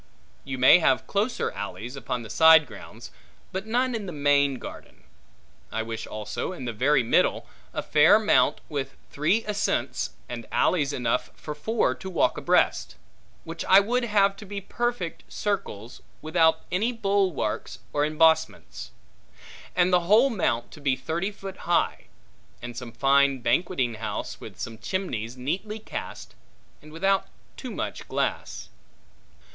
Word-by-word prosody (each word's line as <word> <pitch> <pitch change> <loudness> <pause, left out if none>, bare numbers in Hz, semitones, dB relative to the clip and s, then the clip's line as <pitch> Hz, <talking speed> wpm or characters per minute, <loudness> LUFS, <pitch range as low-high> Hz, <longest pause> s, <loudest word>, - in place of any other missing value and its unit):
You 135 -1 -5
may 130 +7 +7
have 135 -6 +2
closer 210 +5 -1
alleys, 110 +5 -6
upon 125 -2 -4
the 110 - -10
side 160 -1 +7
grounds, - - -11 0.4
but 190 +3 -4
none 250 +3 +1
in 215 -4 -4
the - - -4
main 145 -2 +2
garden. - - -11 0.7
I 110 - -2
wish 115 0 -6
also, 110 - -4
in 150 -8 -7
the 120 - -3
very 135 +4 +3
middle, 115 - +2 0.3
a - - -4
fair 155 +7 +6
mount, 215 -1 +3
with 135 -3 -4 0.2
three 175 +10 +1
ascents, 210 -1 -1
and 120 -2 -7
alleys, 150 -6 +2
enough 125 -2 -1
for 150 - -7
four 220 +10 0
to 190 - -8
walk 175 - +1
abreast; - - +1 0.5
which 165 +1 -6
I 190 - +7
would 240 +5 0
have 200 -3 +3
to 210 - -10
be 200 0 -4
perfect 230 -2 -3
circles, 120 - -4 0.2
without 160 0 +3
any 210 +7 +1
bulwarks 195 - -1 0.2
or 145 - +2
embossments; 160 +1 +1 0.9
and 180 0 +3
the 175 -1 +3
whole 235 +6 +6
mount 120 - -1
to 150 - -13
be 135 -2 +2
thirty 160 +9 -2
foot 195 -2 -9
high; 175 - +1 0.5
and 120 0 -8
some 120 0 -7
fine 140 +1 +3
banqueting 130 -4 +1
house, 110 - -4
with - - -10
some 115 -1 -6
chimneys 120 - -3
neatly 190 +12 -3
cast, 220 - -7 0.5
and 155 - -14
without 195 +4 +1 0.3
too - - -7
much - - -5
glass. - - -3
160 Hz, 150 wpm, -26 LUFS, 130-195 Hz, 0.9 s, may